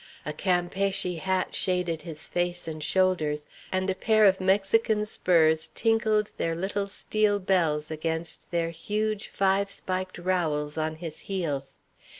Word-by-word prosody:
A 150 - -3
Campeachy 180 +1 0
hat 185 +1 -1
shaded 180 -3 0
his 160 -3 -7
face 175 -1 -2
and 155 -1 -5
shoulders, 155 -4 +1 0.3
and 185 0 0
a 190 - +2
pair 215 +2 +3
of 190 -1 +4
Mexican 210 +3 +2
spurs 160 -6 +2
tinkled 220 -2 +2
their 165 0 -1
little 200 +3 -2
steel 210 +1 +1
bells 165 -6 +1
against 160 +1 -3
their 165 -1 0
huge 210 +5 -2
five 195 +1 +1
spiked 185 -1 -3
rowels 160 -5 -1
on 155 0 -1
his 160 -1 -7
heels. 155 -8 -2
185 Hz, 140 wpm, -27 LUFS, 160-195 Hz, 0.3 s, of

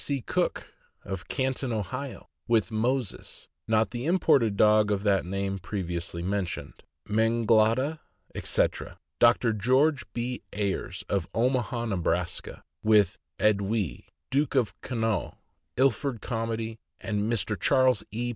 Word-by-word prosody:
C. 140 -1 0
Cook, - - -2 0.5
Canton, 130 -1 -1
Ohio, 115 +6 -4 0.2
with 115 -2 +2
Moses 120 +1 -2 0.2
(not 110 0 +2
the 120 +3 -4
imported 145 - +3
dog 105 0 +5
of 100 -1 0
that 100 -4 +2
name 95 +1 -2
previously 85 -2 -4
mentioned), 90 -7 -3 0.3
Menglada, 115 +6 +2 0.3
etc.; - - -1 0.2
Dr. 120 -1 +4
George 130 +6 +2
B. 120 +1 -3
Ayres, 100 -2 -2
of 95 -4 -1
Omaha, 120 0 0
Neb., 95 -7 -1 0.7
with 105 -2 +3 0.2
Edwy, 100 - 0 0.2
Duke 140 +1 +1
of 125 -5 +2
Connaught, 115 -4 -2 0.4
Ilford 135 -1 +1
Comedy; 115 -1 -3 0.2
Mr. 105 0 0
Charles 130 -5 +3
E. 120 +3 -2
115 Hz, 110 wpm, -27 LUFS, 100-125 Hz, 0.7 s, dog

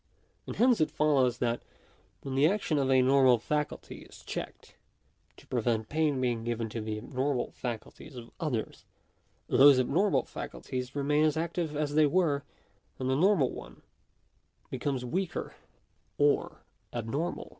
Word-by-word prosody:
And - - -5
hence 245 -4 +4
it 155 - +3
follows 135 -5 +2
that 120 -1 -1 0.6
when 135 - -5
the 140 +3 +4
action 175 -5 0
of 135 -1 +1
a 130 -1 +5
normal 130 -1 +5
faculty 150 +6 -3
is - - -14
checked, - - -7 0.6
to - - -17
prevent 115 -3 -1
pain 155 -3 +1
being 120 -3 -1
given 115 -1 -2
to 115 +1 -5
the 110 0 -4
abnormal 130 +3 -2
facul 120 -3 -5
ties - - -13
of 120 -2 -10
others, 145 -10 -3 0.6
those 140 -1 +6
abnormal 170 +11 +2
faculties 125 +1 -6
remain 145 +2 +2
as 155 0 +1
active 165 -1 -2
as 150 -1 -1
they 155 0 +5
were, 145 -4 +1 0.5
and 130 0 -1
the - - +2
normal 175 -3 +3
one - - -11 0.9
becomes 135 -3 -2
weaker 180 +7 -3 0.6
or 145 0 +1 0.3
abnormal. 135 +9 -3
140 Hz, 145 wpm, -29 LUFS, 125-155 Hz, 0.9 s, those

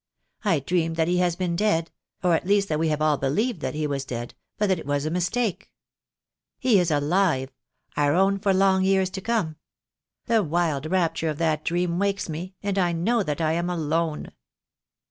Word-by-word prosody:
I 175 -8 +2
dream 165 +3 0
that 160 -1 +1
he 180 +1 +1
has 175 -2 +1
been 175 -2 -1
dead 170 -4 +1 0.2
— - - -40
or 180 -1 +3
at 165 - 0
least 200 0 +2
that 155 -1 0
we 165 - +1
have 155 -1 0
all 155 -2 +3
believed 170 - 0
that - - -3
he 155 0 -1
was 140 -2 -2
dead 120 -2 -6
— - - -58
but 210 - +1
that 190 -4 +1
it 150 - -9
was 145 0 0
a 155 - -1
mistake. 190 +3 -1 0.9
He 245 -6 +3
is 175 -1 +1
alive; 150 -2 +1 0.4
our 145 0 +2
own 195 +2 +3
for 195 0 +1
long 190 0 +3
years 190 -1 +2
to 190 - -5
come. 190 -9 -1 0.7
The 225 -2 +3
wild 160 -4 0
rapture 165 -3 0
of 150 - -3
that 155 -2 0
dream 175 0 0
wakes 200 0 0
me, 175 +4 -6
and 200 -1 0
I 175 -2 +2
know 220 +8 +1
that 150 -3 -2
I 155 -1 +2
am 170 +1 -1
alone. 160 -2 -1
170 Hz, 205 wpm, -25 LUFS, 155-195 Hz, 0.9 s, or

